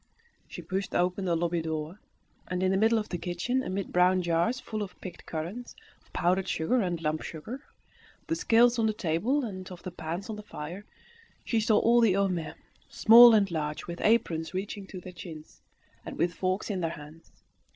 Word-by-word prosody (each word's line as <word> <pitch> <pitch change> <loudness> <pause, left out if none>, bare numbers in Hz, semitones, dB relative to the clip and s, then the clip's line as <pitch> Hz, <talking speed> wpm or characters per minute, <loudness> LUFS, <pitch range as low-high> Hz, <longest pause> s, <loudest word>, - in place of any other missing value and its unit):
She - - -9
pushed 195 0 -3
open 180 +2 +1
the 175 -2 +1
lobby 170 0 0
door, 160 +3 -4 0.5
and 180 0 -2
in 185 - +2
the 190 - +2
middle 225 +3 +3
of 215 - -3
the 175 - -3
kitchen, 180 +10 -1
amid 195 -5 -4
brown 180 +1 +4
jars 170 +9 +1
full 215 -4 -5
of 200 - -7
picked 180 -2 -10
currants, 175 +10 -5 0.3
of - - -29
powdered 185 +2 +1
sugar 240 +10 +1
and 175 -4 -1
lump 155 0 -1
sugar, 230 - -7 0.6
of - - -35
the 330 - -1
scales 235 -3 +4
on 220 - +3
the 215 - 0
table, 215 - 0
and 185 -4 -7
of 180 - -10
the 185 - -5
pans 175 +3 -5
on 220 -2 -5
the - - -7
fire, 180 0 -8 0.6
she 230 - +1
saw 215 0 +3
all 235 +1 +4
the 220 -5 +4
Homais, 180 -5 -1 0.3
small 235 +1 +8
and 200 -3 +2
large, 150 -2 -3
with 170 0 -7
aprons 170 -7 +1
reaching 195 +1 -4
to 185 - -8
their 180 +1 -10
chins, 160 -3 -11 0.4
and - - -8
with 175 0 +1
forks 185 +3 -2
in 190 -3 -2
their 165 - 0
hands. 155 +1 -11
185 Hz, 200 wpm, -28 LUFS, 170-215 Hz, 0.6 s, small